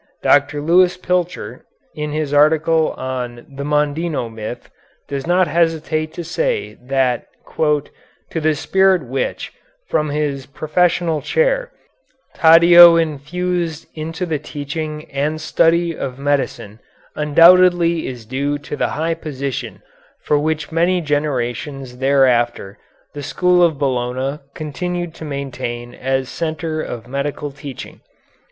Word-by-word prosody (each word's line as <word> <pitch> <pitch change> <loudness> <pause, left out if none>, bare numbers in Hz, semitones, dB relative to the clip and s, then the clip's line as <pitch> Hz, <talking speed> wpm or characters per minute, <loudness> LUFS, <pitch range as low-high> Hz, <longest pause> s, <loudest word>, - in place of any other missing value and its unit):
Dr. 145 +1 +3
Lewis 180 +4 +4
Pilcher, 180 -1 -2 0.3
in 150 0 -4
his 150 -1 -2
article 155 +2 +3
on 125 -2 -5
"The 140 0 -7
Mondino 150 -2 -1
Myth," 110 +1 -7 0.4
does 140 +1 -4
not 180 +1 +3
hesitate 155 -1 0
to 175 - -5
say 470 - -2
that 130 -1 0 0.3
"to 150 -2 +1 0.5
the 155 0 +2
spirit 190 +2 +2
which, 130 +1 -3 0.3
from 150 -1 0
his 145 -2 -2
professorial 165 +2 0
chair, - - +1 0.6
Taddeo 170 +1 +8
infused 165 +1 -2
into 160 +3 -4
the 160 -4 -2
teaching 150 +1 -5
and 145 +3 -1
study 165 +1 +2
of 130 -3 -5
medicine 140 -6 -2 0.4
undoubtedly 170 +2 +5
is 120 -4 -7
due 140 +5 -2
the 145 0 -3
high 165 +2 0
position 135 - -5 0.4
which 150 +1 +1
for - - -16
many 175 +2 +2
generations 135 -3 -3
thereafter 125 -6 +2 0.3
the 145 - -6
school 180 +5 +2
of 165 -4 +3
Bologna 130 +1 -1 0.2
continued 175 +3 -4
to 160 - -9
maintain 120 -4 -5
as 135 +1 -1
a - - -12
centre 160 +2 -3
of 120 -5 -7
medical 140 +2 -3
teaching." 140 -2 -9
150 Hz, 120 wpm, -19 LUFS, 135-165 Hz, 0.6 s, Taddeo